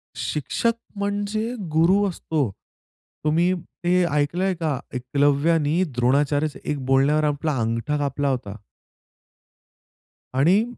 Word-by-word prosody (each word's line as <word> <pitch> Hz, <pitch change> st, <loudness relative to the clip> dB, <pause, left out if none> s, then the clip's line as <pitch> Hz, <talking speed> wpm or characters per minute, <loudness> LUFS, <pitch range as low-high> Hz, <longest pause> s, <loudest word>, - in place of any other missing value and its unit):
शिक्षक 155 Hz, -, -1 dB, 0.2 s
म्हणजे 205 Hz, +3 st, -2 dB, 0.2 s
गुरु 175 Hz, +6 st, +4 dB
असतो. 155 Hz, -, -1 dB, 0.8 s
तुम्ही 170 Hz, +4 st, +3 dB, 0.3 s
ते 180 Hz, +1 st, +3 dB
ऐकलंय 165 Hz, +7 st, +1 dB
का? 155 Hz, -6 st, -1 dB
एकलव्यानी 145 Hz, +6 st, +2 dB
द्रोणाचार्यच्या 145 Hz, +4 st, +1 dB
एक 140 Hz, -3 st, -3 dB
बोलण्यावर 140 Hz, +3 st, +3 dB
आपला 150 Hz, 0 st, 0 dB
अंगठा 115 Hz, +6 st, -1 dB
कापला 145 Hz, 0 st, -1 dB
होता. 120 Hz, -6 st, -3 dB, 1.8 s
आणि 175 Hz, +11 st, +4 dB
150 Hz, 95 wpm, -23 LUFS, 140-175 Hz, 1.8 s, गुरु